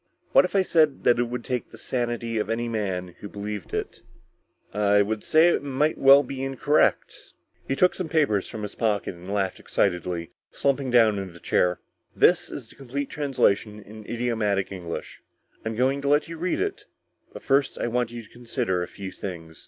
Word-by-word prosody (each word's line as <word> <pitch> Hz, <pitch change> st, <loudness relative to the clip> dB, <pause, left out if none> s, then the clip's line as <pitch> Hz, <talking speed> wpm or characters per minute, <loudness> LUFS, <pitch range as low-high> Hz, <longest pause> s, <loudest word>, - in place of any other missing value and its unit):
What -, -, +6 dB
if -, -, -5 dB
I 195 Hz, -, +5 dB
said 155 Hz, -6 st, +2 dB
that 120 Hz, 0 st, +4 dB
it 120 Hz, -, +2 dB
would 120 Hz, 0 st, -5 dB
take 125 Hz, -2 st, -3 dB
the -, -, -13 dB
sanity 120 Hz, -2 st, -2 dB
of -, -, -2 dB
any 115 Hz, +1 st, -1 dB
man 95 Hz, -5 st, -2 dB
who 100 Hz, -, -8 dB
believed 105 Hz, -2 st, -6 dB
it?" -, -, -4 dB, 0.7 s
"I 105 Hz, 0 st, +4 dB
would 110 Hz, +1 st, -3 dB
say 160 Hz, +2 st, +5 dB
that -, -, +2 dB
it -, -, -10 dB
might 145 Hz, +3 st, 0 dB
well 135 Hz, +1 st, +8 dB
be 135 Hz, 0 st, -5 dB
incorrect." 135 Hz, +3 st, 0 dB, 0.3 s
He 135 Hz, -, 0 dB
took 180 Hz, +5 st, +4 dB
some 180 Hz, -4 st, -4 dB
papers 145 Hz, -, +2 dB
from 110 Hz, -2 st, -6 dB
his 105 Hz, -, -5 dB
pocket 105 Hz, -4 st, -1 dB
and 90 Hz, +2 st, -9 dB
laughed 95 Hz, -2 st, -1 dB
excitedly, 90 Hz, -2 st, -1 dB, 0.2 s
slumping 140 Hz, -1 st, 0 dB
down 115 Hz, -4 st, +4 dB
in 95 Hz, -3 st, -6 dB
the 85 Hz, -, -13 dB
chair. 90 Hz, +1 st, +1 dB, 0.3 s
"This -, -, +4 dB
is -, -, -7 dB
the -, -, -17 dB
complete 140 Hz, +1 st, -5 dB
translation 110 Hz, -7 st, +1 dB
in 105 Hz, +1 st, -12 dB
idiomatic 110 Hz, -5 st, 0 dB
English. 90 Hz, -3 st, -7 dB, 0.4 s
I'm 110 Hz, 0 st, -3 dB
going 135 Hz, +4 st, +1 dB
to 140 Hz, -, -3 dB
let 145 Hz, +1 st, +3 dB
you 165 Hz, -, -7 dB
read 180 Hz, -, -1 dB
it, 410 Hz, +1 st, -3 dB, 0.4 s
but -, -, -10 dB
first 135 Hz, 0 st, +2 dB
I -, -, -2 dB
want 120 Hz, 0 st, 0 dB
you 120 Hz, 0 st, -8 dB
to 110 Hz, -, -18 dB
consider 120 Hz, -6 st, -2 dB
a 90 Hz, -, -3 dB
few 95 Hz, -1 st, -8 dB
things." 80 Hz, -4 st, -8 dB
115 Hz, 200 wpm, -25 LUFS, 100-140 Hz, 0.7 s, well